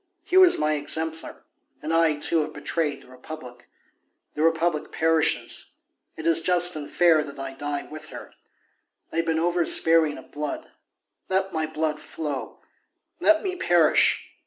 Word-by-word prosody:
He 365 Hz, 0 st, -3 dB
was 370 Hz, -2 st, +7 dB
my 155 Hz, 0 st, +1 dB
exemplar, 160 Hz, +2 st, -3 dB, 0.4 s
and 155 Hz, +2 st, -4 dB
I, 165 Hz, -2 st, +3 dB
too, 160 Hz, +3 st, +1 dB
have 155 Hz, 0 st, -5 dB
betrayed 155 Hz, -4 st, -3 dB
the -, -, -20 dB
Republic; 130 Hz, -1 st, -11 dB, 0.7 s
the 150 Hz, -, -4 dB
Republic 165 Hz, -1 st, 0 dB
perishes; 160 Hz, -1 st, 0 dB, 0.4 s
it 160 Hz, -, -7 dB
is 165 Hz, 0 st, +4 dB
just 175 Hz, 0 st, +4 dB
and 150 Hz, -2 st, -6 dB
fair 170 Hz, -3 st, +4 dB
that 140 Hz, -2 st, -10 dB
I 135 Hz, 0 st, -6 dB
die 145 Hz, +1 st, -4 dB
with 155 Hz, 0 st, -11 dB
her. -, -, -10 dB, 0.8 s
I -, -, -5 dB
have 165 Hz, 0 st, 0 dB
been 160 Hz, -1 st, +1 dB
over 175 Hz, +1 st, +1 dB
sparing 160 Hz, -2 st, +4 dB
of -, -, -14 dB
blood; 150 Hz, 0 st, -5 dB, 0.6 s
let 190 Hz, 0 st, -1 dB
my 160 Hz, -1 st, -1 dB
blood 155 Hz, -1 st, -2 dB
flow! 150 Hz, -5 st, -6 dB, 0.6 s
Let 320 Hz, 0 st, +3 dB
me 375 Hz, -2 st, -2 dB
perish! 175 Hz, -, +3 dB
160 Hz, 160 wpm, -24 LUFS, 150-165 Hz, 0.8 s, was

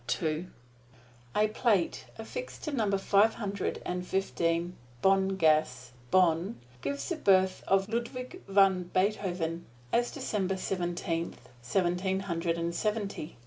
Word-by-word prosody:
A 215 Hz, -, +4 dB
plate 215 Hz, -5 st, +1 dB
affixed -, -, -7 dB
to 305 Hz, -, -2 dB
Number 215 Hz, -7 st, +1 dB
Five 200 Hz, +3 st, +4 dB
Hundred 200 Hz, -3 st, -3 dB, 0.2 s
Fifteen 175 Hz, -2 st, 0 dB, 0.3 s
Bonngasse, 155 Hz, -10 st, +3 dB, 0.2 s
Bonn, 180 Hz, -, +3 dB, 0.3 s
gives 280 Hz, -, -3 dB
the 345 Hz, -, -1 dB
birth 190 Hz, -7 st, +3 dB
of 195 Hz, 0 st, +3 dB
Ludwig 250 Hz, -, -4 dB
van 190 Hz, -2 st, +4 dB
Beethoven 180 Hz, -4 st, 0 dB, 0.3 s
as 240 Hz, 0 st, +3 dB
December 190 Hz, -2 st, -2 dB
Seventeenth, 175 Hz, -2 st, -3 dB
Seventeen 185 Hz, +7 st, 0 dB
Hundred 170 Hz, -2 st, -1 dB
Seventy. 205 Hz, -, -2 dB
190 Hz, 100 wpm, -30 LUFS, 170-210 Hz, 0.3 s, A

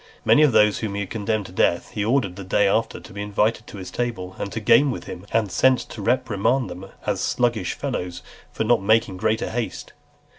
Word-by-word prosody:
Many 150 Hz, -, +6 dB
of 150 Hz, -3 st, +5 dB
those 105 Hz, -2 st, +4 dB
whom 105 Hz, -3 st, -3 dB
he 100 Hz, -, -2 dB
had 95 Hz, -, -6 dB
condemned 110 Hz, -1 st, -1 dB
to 90 Hz, -, -10 dB
death, 85 Hz, -1 st, +1 dB
he 105 Hz, -, -2 dB
ordered 110 Hz, -5 st, +1 dB
the 100 Hz, -, -7 dB
day 95 Hz, +2 st, +2 dB
after 110 Hz, +3 st, 0 dB
to -, -, -13 dB
be 100 Hz, -, -5 dB
invited 105 Hz, +2 st, 0 dB
to -, -, -9 dB
his 95 Hz, -, -8 dB
table, 100 Hz, -7 st, -3 dB
and 100 Hz, -, -4 dB
to 115 Hz, -, -3 dB
game 120 Hz, +6 st, +5 dB
with 125 Hz, -, -4 dB
him, 90 Hz, +3 st, -9 dB
and 110 Hz, -4 st, +1 dB
sent 130 Hz, +7 st, +4 dB
to 110 Hz, -, -8 dB
reprimand 120 Hz, +2 st, +1 dB
them 90 Hz, +2 st, -8 dB, 0.2 s
as -, -, -1 dB
sluggish 115 Hz, -6 st, 0 dB
fellows 90 Hz, 0 st, -4 dB, 0.3 s
for -, -, -2 dB
not 115 Hz, -2 st, +3 dB
making 105 Hz, -2 st, +2 dB
greater 110 Hz, +4 st, 0 dB
haste. 120 Hz, -1 st, -4 dB
105 Hz, 220 wpm, -23 LUFS, 95-115 Hz, 0.3 s, Many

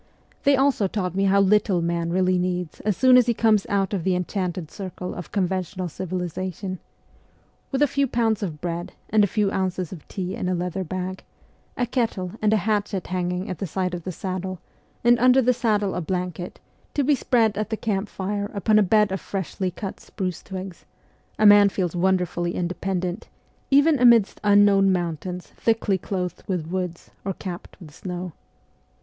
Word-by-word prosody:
They 280 Hz, 0 st, +6 dB
also 265 Hz, -6 st, +2 dB
taught 185 Hz, -3 st, -2 dB
me 195 Hz, +1 st, +1 dB
how 195 Hz, +1 st, +4 dB
little 195 Hz, -1 st, +3 dB
man 170 Hz, 0 st, -1 dB
really 185 Hz, 0 st, +2 dB
needs 180 Hz, -2 st, -2 dB
as 210 Hz, -3 st, -1 dB
soon 255 Hz, -1 st, +6 dB
as 250 Hz, -1 st, +5 dB
he 235 Hz, -, +2 dB
comes 215 Hz, -3 st, +3 dB
out 200 Hz, -1 st, 0 dB
of 190 Hz, -4 st, -1 dB
the 185 Hz, 0 st, +2 dB
enchanted 180 Hz, -2 st, -3 dB
circle 185 Hz, -2 st, -6 dB
of 175 Hz, -, -8 dB
conventional 185 Hz, -1 st, -1 dB
civilization. 185 Hz, +2 st, -4 dB, 0.9 s
With 275 Hz, +1 st, +2 dB
a -, -, +5 dB
few 280 Hz, +1 st, +1 dB
pounds 225 Hz, -3 st, +1 dB
of 160 Hz, -7 st, -4 dB
bread 175 Hz, 0 st, -4 dB, 0.2 s
and 215 Hz, -1 st, +5 dB
a -, -, +4 dB
few 205 Hz, 0 st, 0 dB
ounces 185 Hz, -3 st, -2 dB
of 175 Hz, -6 st, -10 dB
tea 185 Hz, -2 st, -4 dB
in 180 Hz, -, -2 dB
a 185 Hz, -, +1 dB
leather 180 Hz, +2 st, -2 dB
bag, 185 Hz, +2 st, -5 dB, 0.5 s
a 245 Hz, -, +1 dB
kettle 225 Hz, -7 st, -1 dB
and 215 Hz, -1 st, +3 dB
a 220 Hz, -, +4 dB
hatchet 205 Hz, -2 st, -1 dB
hanging 180 Hz, +1 st, -2 dB
at 185 Hz, -6 st, -5 dB
the 195 Hz, -, -3 dB
side 185 Hz, +2 st, -2 dB
of 175 Hz, -2 st, -5 dB
the 185 Hz, -, -4 dB
saddle, 185 Hz, +1 st, -4 dB, 0.5 s
and 240 Hz, 0 st, +5 dB
under 255 Hz, +2 st, +6 dB
the 250 Hz, 0 st, +4 dB
saddle 215 Hz, -5 st, +1 dB
a 180 Hz, -, -2 dB
blanket, 180 Hz, +1 st, -4 dB, 0.4 s
to 285 Hz, -, +2 dB
be 290 Hz, +3 st, +3 dB
spread 230 Hz, -5 st, +2 dB
at 215 Hz, +1 st, -2 dB
the 220 Hz, -, -2 dB
camp 205 Hz, -2 st, -2 dB
fire 205 Hz, +1 st, -3 dB
upon 215 Hz, +1 st, +3 dB
a -, -, +5 dB
bed 210 Hz, +1 st, +3 dB
of 190 Hz, -, -2 dB
freshly 190 Hz, -1 st, -3 dB
cut 190 Hz, +2 st, -6 dB
spruce 185 Hz, -3 st, -5 dB
twigs, 190 Hz, -2 st, -7 dB, 0.5 s
a 215 Hz, -, +3 dB
man 205 Hz, -1 st, +8 dB
feels 180 Hz, -3 st, -2 dB
wonderfully 175 Hz, -1 st, 0 dB
independent, 180 Hz, +2 st, -2 dB, 0.4 s
even 285 Hz, +1 st, +5 dB
amidst 235 Hz, -4 st, +5 dB
unknown 205 Hz, -1 st, +5 dB
moun 175 Hz, -3 st, 0 dB
tains 180 Hz, +2 st, -6 dB
thickly 225 Hz, -4 st, 0 dB
clothed 180 Hz, -1 st, -3 dB
with 180 Hz, -5 st, -1 dB
woods 180 Hz, -3 st, -4 dB
or 195 Hz, -, -2 dB
capped 180 Hz, 0 st, -8 dB
with 155 Hz, -5 st, -12 dB
snow. 180 Hz, 0 st, -5 dB
190 Hz, 185 wpm, -24 LUFS, 180-210 Hz, 0.9 s, man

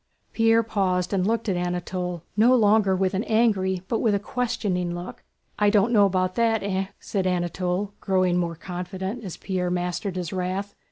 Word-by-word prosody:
Pierre 225 Hz, 0 st, +4 dB
paused 185 Hz, -4 st, 0 dB
and 190 Hz, -1 st, +1 dB
looked 230 Hz, +1 st, 0 dB
at 195 Hz, -, +1 dB
Anatole 180 Hz, -1 st, -3 dB
no 235 Hz, +4 st, +5 dB
longer 210 Hz, -4 st, +4 dB
with 185 Hz, 0 st, 0 dB
an 195 Hz, +3 st, 0 dB
angry 195 Hz, -5 st, +1 dB
but 230 Hz, -, 0 dB
with 215 Hz, -3 st, +2 dB
a -, -, 0 dB
questioning 205 Hz, -7 st, -2 dB
look. 175 Hz, +1 st, -8 dB, 0.4 s
"I 210 Hz, -1 st, +4 dB
don't 210 Hz, +3 st, +3 dB
know 205 Hz, -2 st, +6 dB
about 185 Hz, -1 st, 0 dB
that, 225 Hz, -1 st, +1 dB
eh?" 195 Hz, -1 st, -1 dB
said 190 Hz, -3 st, -2 dB
Anatole, 180 Hz, +2 st, -1 dB
growing 185 Hz, -2 st, +1 dB
more 170 Hz, -1 st, -1 dB
confident 190 Hz, +6 st, -5 dB
as 185 Hz, -5 st, -6 dB
Pierre 185 Hz, -2 st, -2 dB
mastered 180 Hz, +2 st, -2 dB
his 180 Hz, -2 st, -4 dB
wrath. 190 Hz, +2 st, -3 dB
190 Hz, 175 wpm, -25 LUFS, 180-210 Hz, 0.4 s, know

